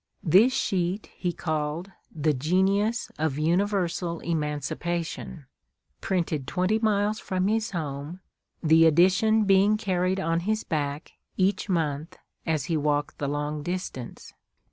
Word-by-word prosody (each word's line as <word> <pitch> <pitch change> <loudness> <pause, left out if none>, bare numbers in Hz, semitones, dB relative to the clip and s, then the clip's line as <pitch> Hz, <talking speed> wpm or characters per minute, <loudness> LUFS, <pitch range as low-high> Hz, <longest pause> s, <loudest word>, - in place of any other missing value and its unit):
This 190 +10 +5
sheet 190 -4 -1
he 180 - -2
called 155 +2 -3 0.2
the 155 -1 +1
"Genius 190 - +1
of 155 -3 0
Universal 175 0 0
Emancipation," 160 0 -3 0.6
printed 165 -7 -1
twenty 185 +8 +1
miles 210 -1 +1
from 185 -1 -1
his 220 +2 0
home, 155 -1 -5 0.4
the 160 +1 +6
edition 190 +7 +4
being 200 +1 +4
carried 185 -2 0
on 165 -2 0
his 215 +5 -1
back, 145 -1 -3 0.3
each 195 +2 +1
month, 155 -3 -1 0.3
as 155 -4 0
he 165 - -1
walked 145 -1 -1
the 140 - -1
long 150 +1 -2
distance. 175 -8 -6
175 Hz, 120 wpm, -26 LUFS, 150-195 Hz, 0.6 s, the